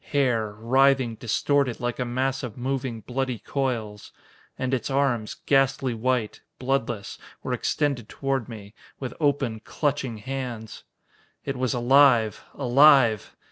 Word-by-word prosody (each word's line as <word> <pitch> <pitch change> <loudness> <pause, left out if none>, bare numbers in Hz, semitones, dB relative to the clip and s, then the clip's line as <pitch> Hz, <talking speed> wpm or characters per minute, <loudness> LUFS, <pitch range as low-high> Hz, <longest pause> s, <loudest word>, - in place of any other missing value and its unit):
Hair 120 -7 +1
writhing, 130 +2 +3
distorted 125 +3 0
like 120 0 -3
a 125 - 0
mass 130 +2 -1
of 125 -3 -7
moving, 130 -2 -3
bloody 130 +1 -2
coils. 115 -6 -3 0.5
And 130 0 -2
its 130 - -1
arms, 135 -6 0
ghastly 135 -2 +2
white, 115 -1 -1 0.2
bloodless, 125 -5 -2 0.2
were - - -2
extended 140 -7 -1
toward 135 -3 -2
me, 105 -3 -10 0.3
with 130 -3 -5
open, 140 -7 0
clutching 135 -1 -2
hands. 120 -1 -6 0.6
It 135 - -2
was 130 -1 -1
alive! 120 -3 +4
Alive! 130 -5 +4
125 Hz, 125 wpm, -25 LUFS, 115-135 Hz, 0.6 s, alive